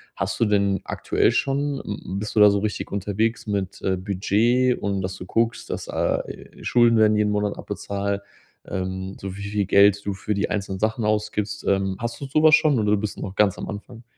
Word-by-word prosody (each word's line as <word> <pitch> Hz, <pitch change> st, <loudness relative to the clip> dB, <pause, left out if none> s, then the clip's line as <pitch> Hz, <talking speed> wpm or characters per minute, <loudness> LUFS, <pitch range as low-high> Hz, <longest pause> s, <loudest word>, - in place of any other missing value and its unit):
Hast -, -, -3 dB
du -, -, +4 dB
denn 100 Hz, -2 st, +2 dB
aktuell -, -, +1 dB
schon 140 Hz, 0 st, 0 dB
m 100 Hz, -, -5 dB
m 95 Hz, +2 st, -4 dB
bist 105 Hz, +1 st, -5 dB
du -, -, +6 dB
da 105 Hz, -1 st, +9 dB
so 100 Hz, -, +1 dB
richtig 105 Hz, 0 st, -3 dB
unterwegs 105 Hz, +4 st, -1 dB
mit, 100 Hz, -2 st, -3 dB
äh, 95 Hz, -1 st, 0 dB
Budget 110 Hz, +7 st, +1 dB
und 100 Hz, -1 st, -1 dB
dass 95 Hz, 0 st, -4 dB
du -, -, -8 dB
guckst, 115 Hz, +4 st, -1 dB
dass -, -, -5 dB
ah -, -, 0 dB
e -, -, -11 dB
Schulden 120 Hz, -1 st, +4 dB
werden 110 Hz, -1 st, +4 dB
jeden 105 Hz, -1 st, +2 dB
Monat 105 Hz, 0 st, -1 dB
abbezahlt, 100 Hz, 0 st, -3 dB, 0.4 s
ähm, 95 Hz, 0 st, -4 dB
so 95 Hz, -1 st, -6 dB
wie 100 Hz, -, -8 dB
viel 100 Hz, 0 st, -1 dB
Geld 100 Hz, +1 st, +4 dB
du 100 Hz, -, -1 dB
für 100 Hz, +2 st, -3 dB
die 100 Hz, -, -1 dB
einzelnen 95 Hz, -2 st, -3 dB
Sachen 110 Hz, +2 st, 0 dB
ausgibst, 105 Hz, -1 st, -1 dB
ähm. 95 Hz, -1 st, +1 dB
Hast 120 Hz, +3 st, -4 dB
du -, -, -3 dB
so 155 Hz, +3 st, +2 dB
was 155 Hz, -1 st, +8 dB
schon 145 Hz, -6 st, +2 dB
oder 105 Hz, -1 st, +2 dB
bist 105 Hz, 0 st, -3 dB
du -, -, -8 dB
noch 95 Hz, 0 st, -6 dB
ganz 100 Hz, -2 st, +3 dB
am -, -, -6 dB
Anfang? 115 Hz, +3 st, -8 dB
105 Hz, 220 wpm, -23 LUFS, 100-110 Hz, 0.4 s, da